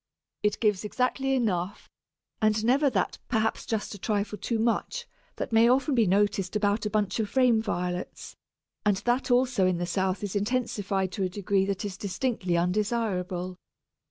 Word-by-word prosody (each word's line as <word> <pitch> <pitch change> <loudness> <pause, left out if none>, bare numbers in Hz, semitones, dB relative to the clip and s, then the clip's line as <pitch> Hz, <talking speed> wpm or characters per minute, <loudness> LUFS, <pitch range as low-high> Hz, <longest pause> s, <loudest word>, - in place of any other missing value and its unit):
It 210 0 0
gives 210 -4 +1
exactly 260 +4 0
enough, 200 -5 -1 0.5
and 215 0 +2
never 275 +4 +4
that 200 -8 -1
perhaps 220 -1 0
just 220 -2 -2
a 205 - -9
trifle 210 0 -1
too 225 +4 -1
much 235 - 0 0.3
that - - -4
may 225 +1 +6
often 265 +3 +3
be 230 -5 +3
noticed 200 0 +1
about 210 +1 +1
a - - -2
bunch 210 0 0
of 215 -2 -1
frame 250 -3 +4
Violets, 180 -4 -4 0.5
and 205 -2 +3
that 245 +6 0
also 245 -6 +3
in 185 -1 +1
the 175 - -1
south 190 +2 -1
is 205 0 -4
intensified 205 -4 -1
to 195 - -2
a 185 - 0
degree 195 0 0
that 200 +1 -2
is 195 -2 -5
distinctly 195 -3 -1
undesirable. 185 -1 -1
210 Hz, 165 wpm, -27 LUFS, 190-230 Hz, 0.5 s, may